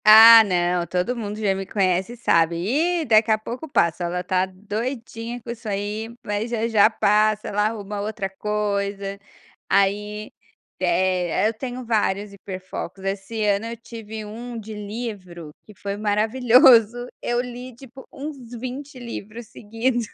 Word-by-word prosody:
Ah 225 +1 +11
não, 175 -3 0
todo 180 +7 -1
mundo 210 -3 -5
já 205 -3 +2
me 195 0 -4
conhece 190 +3 0
sabe, 170 -8 +3 0.5
e - - -3
daqui 225 -2 +4
a 220 - +4
pouco 245 +8 -7
passa, 170 -7 +1
ela 180 +1 -2
está 185 +1 0
doidinha 230 +4 -5
com 235 0 -7
isso 230 -2 -7
aí, 205 +2 -3 0.2
mas 210 +3 -2
já, 230 -1 -1
já 215 -2 +5
passa, 215 -1 +2
ela 210 +1 +1
arruma 205 -2 -5
outra 205 -2 -3
coisa, 200 0 -2 0.5
aí, 210 +2 +1 0.5
eh, 185 +1 +1
eu - - -4
tenho 250 +2 -6
vários 205 -3 0
hiper 190 -1 -7
focos, 185 0 -7
esse 195 +3 -3
ano 205 +2 +1
eu 235 0 -6
tive 220 -2 -8
um 235 +3 -7
de 220 0 -8
livro 205 -7 -7
que 210 - -16
foi 200 +1 -4
maravilhoso, 230 +2 +4 0.2
eu 240 0 0
li 245 0 -6
tipo 265 +1 -13
uns 290 +1 -7 0.2
20 265 +3 -7
livros 235 -2 -8
seguidos. 230 +2 -2
215 Hz, 150 wpm, -23 LUFS, 195-235 Hz, 0.5 s, Ah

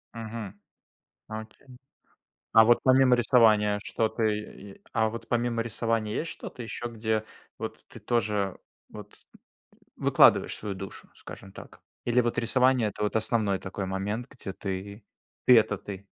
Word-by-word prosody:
Мгм. 110 -3 -7 0.7
Окей. 110 +4 -9 0.9
А 110 - +9
вот 120 +1 +5
помимо 130 -1 +5
рисования 110 -4 +4
что-то, 110 0 -1
э, 110 -1 +3 0.4
е - - -24
а 110 -1 +2
вот 115 +1 -8
помимо 120 -1 0
рисования 115 -1 -1
есть 165 - -2
что-то 125 - -8
еще, 120 +1 -5
где 110 -1 -2 0.3
вот - - -6
ты - - -12
тоже 105 -5 -1 0.3
вот 105 -1 -11 0.8
выкладываешь - - +4
свою 100 -2 -5
душу, 95 +1 -9
скажем 95 - -11
так? - - -13 0.2
Или 120 +1 +3
вот 120 0 -2
рисование- 125 -1 +3
это 105 - -9
вот 105 - -1
основной 110 -3 +1
такой 95 +1 -5
момент, 105 +6 -3
где 100 -8 -8
ты 100 +2 -6 0.4
ты- 125 -2 +9
это 105 -2 +2
ты? 100 -1 -8
110 Hz, 145 wpm, -27 LUFS, 105-120 Hz, 0.9 s, А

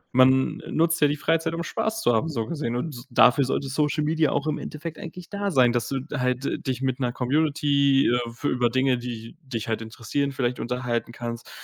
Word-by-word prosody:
Man 130 +1 +5
nutzt 165 0 +1
ja 145 - +6
die 145 - 0
Freizeit, 165 +2 0
um 170 - -3
Spaß 220 +4 -2
zu 120 - +4
haben, 115 +9 +1
so 115 -7 -2
gesehen, 135 -5 -3
und 125 -1 -4
dafür 125 +3 +5
sollte 135 +1 -1
Social 150 +2 0
Media 155 0 +2
auch 145 +1 -1
im 155 -1 -1
Endeffekt 155 +1 -7
eigentlich 175 +1 -8
da 200 0 -2
sein, 130 -7 +4
dass 120 -1 -1
du 135 -2 -2
halt 125 +1 -1
dich 130 0 -2
mit 130 0 0
'ner 125 -2 0
Community, 140 0 +2
äh, 120 -1 0
f 120 +4 -15
über 125 -4 +2
Dinge, 130 0 +2
die 115 -2 -7
dich 120 -6 -5
halt 110 0 -1
interessieren, 125 +5 -2
vielleicht 125 -2 -1
unterhalten 120 -1 -2
kannst, 120 0 -6
130 Hz, 205 wpm, -25 LUFS, 120-150 Hz, -, ja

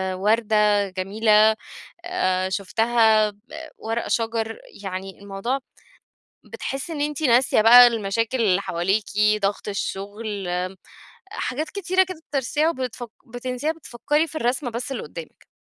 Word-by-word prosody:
وردة 210 0 +2
جميلة 210 +3 +3 0.5
آآ 185 - 0
شُفتها 220 +2 +2
ب 200 - -27 0.4
ورق 225 +1 -3
شجر، 225 -1 -1 0.2
يعني 190 0 -6
الموضوع 200 +7 -3 0.9
بتحسي 270 +5 -5
إن 290 - -4
أنتِ 295 +1 -2
ناسية 245 -3 +4
بقى 245 +2 +9
المشاكل 230 +2 -1
اللي 195 -3 +3
حواليِكِ، 190 +4 0 0.4
ضغط 200 +1 -1
الشغل، 200 0 -4
آمم 180 +1 -2 0.6
حاجات 305 - -3
كتيرة 375 0 +1
كده 370 -3 -9
بترسيها 290 +3 +1
وبتفَك 255 -5 -5 0.2
بتنسيها 250 +4 -2
بتفكري 295 +1 -1
في 315 - -13
الرسمَة 245 -1 -1
بس 245 +3 -5
اللي 240 - -5
قدامِك. 160 +2 -10
225 Hz, 125 wpm, -23 LUFS, 200-260 Hz, 0.9 s, بقى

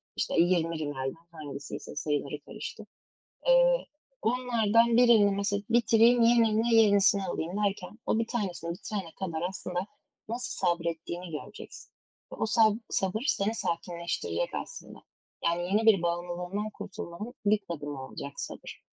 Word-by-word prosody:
işte, - - -1
20 170 -2 +1
rimelden 145 -2 -3 0.2
hangisiyse 145 -3 -8
sayıları 145 -1 -2
karıştı." - - -8 0.6
Eee, - - +5 0.4
onlardan 230 -1 +3
birini 230 -5 +6
mesela, 200 +1 -1
“Bitireyim, 235 +1 +5
yerine 230 -1 +4
yenisini 200 -2 +5
alayım.” 170 -2 -3
derken 205 +2 -3
o 220 - +1
bir 230 - -1
tanesini 185 -8 -3
bitirene 185 -1 -5
kadar 170 -5 -3
aslında 180 -2 -4 0.5
nasıl 230 -5 -2
sabrettiğini 170 0 -2
göreceksin 150 - -9 0.4
ve - - -5
o - - 0
sab 220 -1 +4
sabır 195 +4 -1
seni 210 +3 +1
sakinleştirecek 170 - -2
aslında. - - -11 0.5
Yani, 170 +1 +1
yeni 210 +5 +1
bir 210 -5 +6
bağımlılığından 175 +4 -2
kurtulmanın 205 +1 -7
ilk 205 0 +3
adımı 145 -4 -5
olacak, 140 +1 -7
sabır. - - -7
195 Hz, 125 wpm, -29 LUFS, 170-225 Hz, 0.6 s, birini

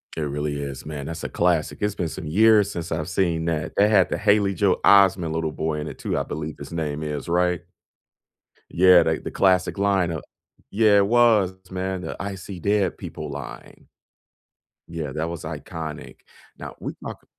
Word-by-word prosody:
It 80 - -3
really 75 0 -3
is, 70 -1 -6
man, 75 -2 -6
that's 80 - -6
a - - -3
classic, 85 -3 0
it's 105 -1 0
been 85 - -2
some 80 +1 -7
years 105 +4 +5
since 85 -4 -6
I've 80 0 -2
seen 85 -3 0
that, 80 -2 -2
they 100 +1 +4
had 95 -4 +4
the - - -1
Haley 100 -1 +3
Joel 95 +1 +1
Osment 95 -5 +5
little 80 -1 -1
boy 80 0 -2
in 75 - -5
it - - -8
too, - - -2
I - - 0
believe 75 +1 -5
his 70 +1 -9
name 75 -2 -3
is, 75 -1 -4
right? 90 0 +1 1.1
Yeah, 90 -1 +6
they 80 0 0
the - - -7
classic 95 -1 +2
line 100 -3 +1
of 80 -3 -5 0.5
Yeah, 105 -1 +4
it 100 - +3
was, 110 -5 +4 0.2
man, 95 0 -3
the, - - -5
"I 100 0 -4
see 95 -1 -9
dead 100 +1 +1
people," - - -7
line. - - -9 1.0
Yeah, 80 -4 -5
that 80 +2 -2
was 85 -2 -6
iconic. 80 0 -7 0.4
Now - - -8
we - - -5
talk - - -8
85 Hz, 190 wpm, -23 LUFS, 80-100 Hz, 1.1 s, Yeah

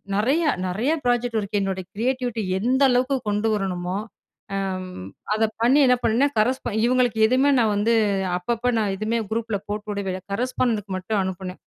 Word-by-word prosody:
நெறைய, 265 +11 +2 0.2
நெறைய 215 +11 0
project 245 -1 +1
work 205 +1 -2
என்னோட 190 -1 -2
கிரியேட்டிவிட்டி 245 0 -1 0.2
எந்த 255 +6 +1
அளவுக்கு 255 +2 +2
கொண்டு 210 +2 0
வரணுமோ, 185 -2 -2 0.6
அம் 185 -1 -3 0.4
அத 220 - +1 0.2
பண்ணி 260 +5 +5
என்ன 250 0 +4
பண்ணேன், 255 +6 +2
கரஸ்பா 255 +4 0
இவுங்களுக்கு 245 -2 +2
எதுவுமே 260 +4 +3
நான் 220 -3 +2
வந்து 210 +3 +2 0.4
அப்பப்ப 235 +6 -1
நான் 205 -3 0
எதுவுமே 220 +3 -1
குரூப்ல 225 -2 -2
போட்டுவிடவே 205 -2 -3
இல்ல. 185 - -5
கரஸ்ஃபாண்டென்டுக்கு 225 -4 -1
மட்டும் 200 +2 -1
அனுப்புனேன். 185 0 -5
220 Hz, 150 wpm, -23 LUFS, 195-245 Hz, 0.6 s, பண்ணி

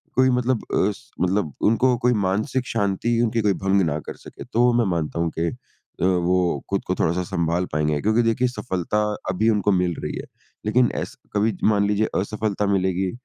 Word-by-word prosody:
कोई 130 +1 +4
मतलब 125 -1 +1
अ, 100 - +3
स 100 - -14
मतलब 90 -4 0 0.2
उनको 125 +3 +3
कोई 125 +1 +2
मानसिक 125 +7 -1
शांति 115 +2 0
उनकी 115 -1 +1
कोई 105 -2 +2
भंग 95 +1 +1
ना 75 -1 -1
कर - - -8
सके। - - -11
तो 120 0 +2
मैं 120 -1 +3
मानता 85 -2 -2
हूँ 85 0 +1
कि 85 - +1
अ, - - -8 0.5
वो 90 -4 +1
खुद - - -1
को - - 0
थोड़ा-सा 85 +3 +1
संभाल 85 -1 -1
पाएँगे 75 -1 0
क्योंकि 110 +3 +3
देखिए 115 +2 +2
सफलता 105 -4 -2 0.3
अभी 105 +5 +2
उनको 105 -1 +2
मिल 90 -2 +1
रही - - -3
है, - - -6 0.4
लेकिन 120 +3 +3
ऐसे - - -6
कभी 105 -1 +1
मान 100 -1 +2
लीजिए 105 +1 +1
असफलता 105 +1 -1
मिलेगी 95 -1 0
100 Hz, 190 wpm, -23 LUFS, 90-115 Hz, 0.5 s, कोई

